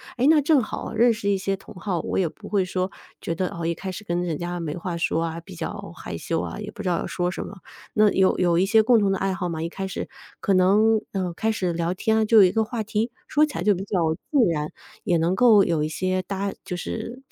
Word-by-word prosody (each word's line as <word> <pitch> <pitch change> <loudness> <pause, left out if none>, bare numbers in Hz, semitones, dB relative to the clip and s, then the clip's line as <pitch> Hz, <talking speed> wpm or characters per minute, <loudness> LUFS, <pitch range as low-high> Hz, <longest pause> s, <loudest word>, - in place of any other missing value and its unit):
诶， 255 +2 +2
那 310 0 +6
正 290 -2 +3
好 220 - -5
认 235 +2 +4
识 210 -2 -2
一 200 - +2
些 195 0 -2
同 195 - -14
好， 180 -1 -2
我 - - -3
也 180 -4 +2
不 205 +6 -13
会 200 -3 +1
说 185 +1 -2 0.3
觉 165 - -3
得， 185 +2 -1
呃， 170 -1 -5
一 170 - 0
开 190 +3 -5
始 210 +4 -8
跟 175 0 -1
人 165 -4 -2
家 175 +1 -4
没 155 0 -4
话 175 0 -4
说 165 -1 0
啊， 165 0 -5
比 160 - -12
较 - - -6
害 85 - -6
羞 165 - -2
啊， - - -4
也 210 - -6
不 - - -8
知 200 - -4
道 175 -2 +1
要 - - -3
说 175 -1 -1
什 180 - -5
么。 205 - -10 0.4
那 215 -1 +5
有 190 -1 +3
有 175 -2 +3
一 185 - +4
些 220 +3 +5
共 235 +2 +5
同 200 -3 +2
的 195 - +1
爱 195 0 0
好 185 -2 -3
嘛， 160 -2 -4
一 165 - -1
开 190 +3 -5
始 - - -4 0.3
可 200 - +1
能， 210 +4 +4
呃， 185 -3 -2
开 220 +6 0
始 185 -5 -1
聊 170 +1 -1
天 220 +4 0
啊， - - +3
就 220 +1 +4
有 210 - +10
一 180 - +5
个 220 0 +2
话 225 +1 -4
题， 220 +2 -1 0.2
说 300 +1 +4
起 300 - -9
来 170 - -2
就 205 -1 +4
比 185 - -4
较 195 -1 -1 0.3
自 290 - +3
然， 150 -1 -3 0.3
也 180 -5 +2
能 170 +3 +1
够 220 -3 +6
有 165 -4 +1
一 155 - -1
些 185 +3 -1
搭 195 +2 -3
就 180 - -4
是 225 +7 -5
190 Hz, 300 characters per minute, -24 LUFS, 175-215 Hz, 0.4 s, 有